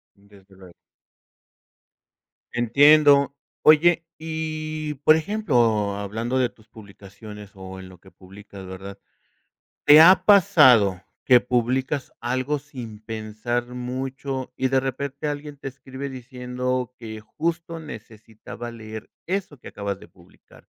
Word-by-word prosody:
Desde 100 -1 -21
luego. 95 -2 -15 1.8
Entiendo. 140 +4 +5 0.3
Oye, 165 +2 +5
y, 155 -1 -4
por 155 - +7
ejemplo, 120 - +1
hablando 110 +5 -3
de 125 -2 +1
tus 110 0 -25
publicaciones 105 0 -12
o 95 -1 -10
en 95 - -11
lo 95 -1 -15
que 95 +2 -19
publicas, 95 +1 -13
¿verdad? 95 +1 -9 0.9
¿Te 150 +1 +9
ha 180 +4 +7
pasado 125 - +5 0.2
que 125 - +7
publicas 130 +3 -1
algo 130 +4 -1
sin 125 -7 -10
pensar 110 +2 -4
mucho 130 +2 -5
y 130 - 0
de 130 0 +2
repente 140 +2 -4
alguien 145 0 -6
te 135 - -6
escribe 135 +1 -8
diciendo 125 -1 -4
que 110 -2 -8
justo 165 +7 -4
necesitaba 115 -4 -10
leer 110 -1 -9 0.2
eso 185 -6 -3
que - - -11
acabas 100 -1 -5
de - - -14
publicar? 90 -1 -22
125 Hz, 120 wpm, -23 LUFS, 105-145 Hz, 1.8 s, Te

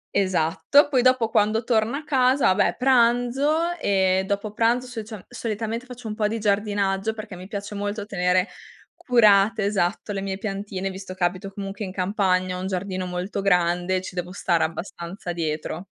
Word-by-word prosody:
Esatto. 190 - +3
Poi 260 -4 +3
dopo, 255 -2 +3
quando 220 +1 +2
torno 225 +1 +1
a 305 - -7
casa, 265 -2 +2
vabbè - - +2
pranzo 260 +6 +2
e 190 -5 +2
dopo 205 +1 -2
pranzo, 235 +3 +2
socia 225 -4 -8
solitamente 230 0 -4
faccio 245 -2 -9
un 215 - -3
po' 215 0 0
di 225 +2 -2
giardinaggio, 205 0 0
perché 215 -3 -8
mi 180 +1 -10
piace 200 0 -6
molto 205 +1 -3
tenere 180 -2 +1 0.5
curate, 215 -4 +4
esatto, 200 0 -1
le 195 - -3
mie 195 -1 -3
piantine, 195 -2 -4
visto 190 -1 -8
che 180 - -4
abito 185 +2 -1
comunque 200 +1 -6
in 190 - -5
campagna, 185 -1 0
ho - - -5
un 190 - -3
giardino 185 -1 -3
molto 180 +3 -3
grande 180 -1 +2
e 185 - 0
ci - - -7
devo 180 0 -4
stare 175 -3 +1
abbastanza 170 +2 -5
dietro. 160 +1 -3
200 Hz, 175 wpm, -24 LUFS, 185-225 Hz, 0.5 s, curate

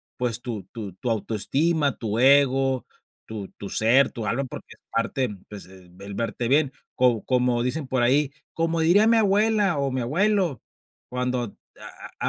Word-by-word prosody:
pues, 120 -1 -2
tu 110 -5 -5
tu 105 -6 -7
tu 120 +7 -5
autoestima, 140 +8 0
tu 110 -1 -2
ego, 135 -1 +4 0.4
tu 105 -3 -7
tu 100 - -7
ser, 125 +5 +3
tu 115 -3 -5
alma 135 +5 -1
porque 130 - -9
es - - -24
parte, 125 +2 -1 0.2
pues, 105 -1 -8
el 95 +1 -12
verte 115 +2 -2
bien. 140 +2 +3 0.2
Co 125 -4 +2
como 125 -2 +1
dicen 135 +3 -2
por 130 -1 0
ahí: 135 +3 +3 0.2
"Como 165 0 -1
diría 190 +7 +5
mi 230 0 +5
abuela 210 -3 +2
o 140 -1 0
mi 130 0 -2
abuelo, 175 - +1 0.5
cuando 125 -3 -3 0.6
a - - 0
125 Hz, 160 wpm, -24 LUFS, 115-150 Hz, 0.6 s, diría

